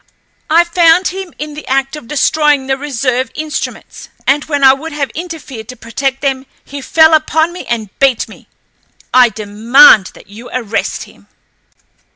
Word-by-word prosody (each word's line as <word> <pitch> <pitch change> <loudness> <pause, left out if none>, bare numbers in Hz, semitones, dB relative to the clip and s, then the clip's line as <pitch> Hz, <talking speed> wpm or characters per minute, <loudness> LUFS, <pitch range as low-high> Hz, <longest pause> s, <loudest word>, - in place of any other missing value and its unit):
I 330 +2 +5
found 345 +1 +3
him 380 -1 -7
in 300 0 -6
the 300 - -10
act 270 +2 -1
of 300 -6 -11
destroying 295 -1 +1
the 265 0 0
reserve 260 -2 -2
instruments, 310 -1 -6 0.2
and 290 +2 +2
when 290 -2 -2
I 265 0 +8
would 310 +4 -7
have 285 -2 -3
interfered 310 -9 -8
to 255 - -8
protect 265 +4 -3
them 270 -1 -2 0.2
he 280 0 -8
fell 315 +3 +4
upon 315 +2 +1
me 360 - -9
and 220 -4 -3
beat 270 -4 +2
me. - - -16 0.7
I 250 -1 +6
demand 215 +1 +4
that - - -15
you 220 +5 -12
arrest 230 -4 -3
him!" - - -19
275 Hz, 165 wpm, -13 LUFS, 255-310 Hz, 0.7 s, I